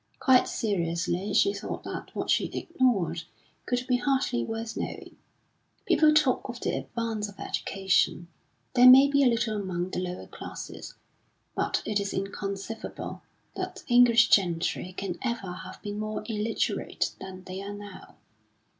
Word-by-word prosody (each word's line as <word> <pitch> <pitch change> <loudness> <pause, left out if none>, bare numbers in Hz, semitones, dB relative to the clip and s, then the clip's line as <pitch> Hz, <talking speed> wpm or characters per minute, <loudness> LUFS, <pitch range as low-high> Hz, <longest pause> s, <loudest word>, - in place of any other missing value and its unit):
Quite 260 -2 +5
seriously 180 -1 -1
she 400 - +4
thought - - -5
that - - -7
what - - -1
she - - +3
ignored 245 - 0 0.5
could 245 0 0
be 250 -1 +2
hardly 260 - 0
worth 225 - -4
knowing. - - -6 0.7
People 310 -1 +5
talk 300 -4 +2
of 240 0 -6
the - - -1
advance 225 -3 -3
of 200 - -15
education; 190 -3 0 0.5
there 250 0 +8
may 265 +2 +9
be 280 0 +3
a - - +6
little 230 -3 +1
among 180 -1 -3
the - - -2
lower 180 0 -4
classes, - - -8 0.6
but - - -1
it 210 -1 0
is 200 0 -3
inconceivable 195 +2 -5 0.3
that - - -5
the 245 - -1
English 240 -1 +6
gentry 180 -1 +2
can 185 -3 -4
ever 235 -7 -2
have 185 +1 -9
been 205 0 -4
more 215 0 -3
illiterate 220 0 -1
than 185 -1 -9
they 185 +1 -6
are 200 +1 -6
now. 205 -2 -11
210 Hz, 150 wpm, -28 LUFS, 190-245 Hz, 0.7 s, may